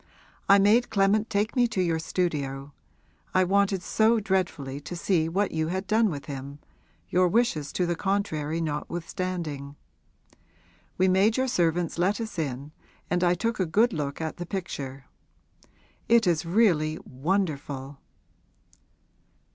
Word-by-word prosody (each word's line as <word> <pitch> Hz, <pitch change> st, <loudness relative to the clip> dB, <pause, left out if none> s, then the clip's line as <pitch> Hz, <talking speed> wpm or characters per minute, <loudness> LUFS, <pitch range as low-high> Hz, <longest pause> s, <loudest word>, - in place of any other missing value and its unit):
I 200 Hz, -, +8 dB
made 215 Hz, +5 st, +4 dB
Clement 205 Hz, +2 st, +2 dB
take 210 Hz, +4 st, 0 dB
me 245 Hz, -2 st, +4 dB
to 215 Hz, -, -4 dB
your 170 Hz, -3 st, +1 dB
studio 145 Hz, -5 st, -2 dB, 0.6 s
I 185 Hz, -, +5 dB
wanted 195 Hz, 0 st, +1 dB
so 220 Hz, +4 st, +3 dB
dreadfully 180 Hz, -9 st, -2 dB
to 175 Hz, -, -7 dB
see 170 Hz, -2 st, +1 dB
what 195 Hz, +4 st, 0 dB
you 160 Hz, -1 st, -1 dB
had 190 Hz, +3 st, -2 dB
done 220 Hz, 0 st, +3 dB
with 145 Hz, -5 st, -6 dB
him, 140 Hz, 0 st, -7 dB, 0.5 s
your 180 Hz, +1 st, +3 dB
wishes 175 Hz, -8 st, +1 dB
to 180 Hz, -, +1 dB
the 175 Hz, 0 st, -1 dB
contrary 165 Hz, -5 st, -1 dB
notwithstanding. 160 Hz, -2 st, -4 dB, 1.2 s
We 185 Hz, -, +3 dB
made 195 Hz, +5 st, +3 dB
your 260 Hz, 0 st, +1 dB
servants 170 Hz, -6 st, 0 dB
let 195 Hz, +5 st, +1 dB
us 220 Hz, -6 st, -5 dB
in 140 Hz, -1 st, -4 dB, 0.4 s
and 180 Hz, 0 st, +1 dB
I 175 Hz, 0 st, +3 dB
took 230 Hz, +4 st, -2 dB
a 185 Hz, -, +2 dB
good 220 Hz, +8 st, +3 dB
look 145 Hz, -3 st, -3 dB
at 160 Hz, -1 st, -4 dB
the 175 Hz, -, -5 dB
picture. 135 Hz, -8 st, -5 dB, 1.0 s
It 230 Hz, -1 st, +5 dB
is 165 Hz, -2 st, +1 dB
really 165 Hz, -6 st, +2 dB
wonderful!' 140 Hz, -3 st, -2 dB
175 Hz, 140 wpm, -26 LUFS, 150-200 Hz, 1.2 s, I